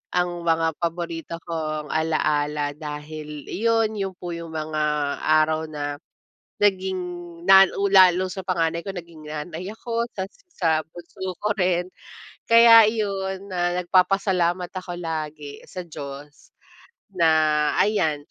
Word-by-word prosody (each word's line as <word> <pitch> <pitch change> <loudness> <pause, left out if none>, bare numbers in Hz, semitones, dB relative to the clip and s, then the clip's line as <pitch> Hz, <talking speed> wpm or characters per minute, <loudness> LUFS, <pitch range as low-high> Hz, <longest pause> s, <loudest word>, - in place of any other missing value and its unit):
ang 180 0 +2 0.2
mga 165 0 +3
paborito 170 -1 -3
kong 155 -2 -4
ala-ala 150 -2 0
dahil 150 0 -7
iyon, 225 -1 0
yun 190 -2 -3
po 175 -1 -7
yung 165 -1 -7
mga 155 0 -2 0.4
araw 155 +1 +2
na 145 -1 -5 0.6
naging 190 -2 +2 0.5
nan 195 0 +8
u 200 - +2
lalo 185 -1 +6
sa 190 0 -6
panganay 170 -3 0
ko 195 - -4
naging 170 -4 -10
nanay 160 +6 -6
ako, 230 +1 -3
tas 190 +1 -5 0.2
sa 160 - +1
bunso 175 +3 -8
ko 210 - 0
rin. 180 -1 +1 0.6
Kaya 230 -1 +8
yun, 195 -3 -3
na 175 0 0
nagpapasalamat 180 -1 +2
ako 180 -2 -6
lagi 155 -3 -5
sa 180 -1 -7
Diyos 145 -1 -10 0.7
na 155 -3 +3
ayan, 160 -9 0
170 Hz, 125 wpm, -23 LUFS, 155-190 Hz, 0.7 s, nan